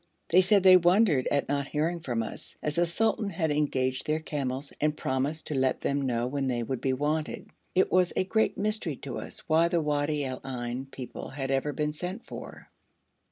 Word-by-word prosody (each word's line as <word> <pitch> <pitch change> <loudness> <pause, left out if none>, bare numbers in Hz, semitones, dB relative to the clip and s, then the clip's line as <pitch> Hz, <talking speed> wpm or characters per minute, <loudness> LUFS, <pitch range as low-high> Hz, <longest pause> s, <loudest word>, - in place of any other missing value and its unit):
They 180 +3 +6
said 190 +1 +4
they 185 -1 +9
wondered 175 - +4
at 140 -1 +1
not 140 0 -1
hearing 160 +4 -1
from 120 -7 -2
us, 110 - -7
as 150 +2 -1
the 175 0 +3
sultan 220 +3 0
had 165 -4 -1
engaged 130 -3 0
their 155 0 +2
camels 140 -3 -3
and 150 0 +1
promised 135 +4 -1
to - - -3
let 130 -1 +1
them 140 0 0
know 120 -1 0
when 135 +1 -1
they 120 -2 0
would 130 +2 -3
be 135 - +1
wanted. 150 +3 -2 0.2
It 185 - +3
was 180 -1 +4
a - - +2
great 220 +4 +1
mystery 210 -7 0
to 130 -1 -6
us - - -9
why 165 +1 +4
the 170 0 +1
Wadi 150 -1 0
al 130 -1 -5
Ain 125 0 -4
people 130 -2 -8
had 135 -1 -4
ever 135 +2 +1
been 150 +2 -1
sent 180 +8 -5
for. - - -10
150 Hz, 205 wpm, -28 LUFS, 135-170 Hz, 0.2 s, they